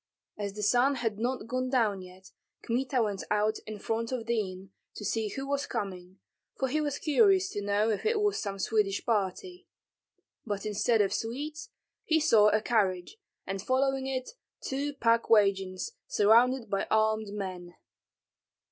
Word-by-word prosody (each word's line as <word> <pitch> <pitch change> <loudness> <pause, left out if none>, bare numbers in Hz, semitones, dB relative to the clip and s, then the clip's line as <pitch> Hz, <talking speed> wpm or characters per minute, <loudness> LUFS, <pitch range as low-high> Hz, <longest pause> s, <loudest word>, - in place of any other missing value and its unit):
As 200 -1 -4
the 210 +1 -5
sun 245 +6 +3
had 225 -4 -2
not 245 0 -2
gone 255 +2 -2
down 220 -7 +1
yet, 185 +1 -14 0.3
Kmita 250 +1 0
went 205 -3 -3
out 210 +1 +1
in 215 0 -6
front 225 +3 -3
of 245 -3 -3
the 235 -1 +1
inn 185 +1 -12 0.2
to 210 - -7
see 220 +1 0
who 270 +6 -5
was 280 0 -1
coming, 185 -2 -5 0.4
for 265 - -1
he 305 +4 0
was 290 -2 -2
curious 380 +4 +3
to 205 - -4
know 205 +2 +1
if 210 - -2
it 440 0 +1
was 415 -1 +1
some 200 -2 -4
Swedish 205 0 0
party; 230 - -2 0.8
but 205 -2 -4
instead 215 +2 +2
of 195 - +1
Swedes 295 - -4 0.3
he 320 0 +2
saw 225 -9 +5
a 215 0 +1
carriage, 195 - 0 0.3
and 195 0 -4
following 265 +3 0
it 255 -1 -3 0.3
two 280 +2 -3
pack 230 -2 +2
wagons, 195 - +2 0.2
surrounded 235 +4 +4
by 195 -1 -1
armed 220 0 +2
men. 185 -4 -6
225 Hz, 165 wpm, -29 LUFS, 200-265 Hz, 0.8 s, saw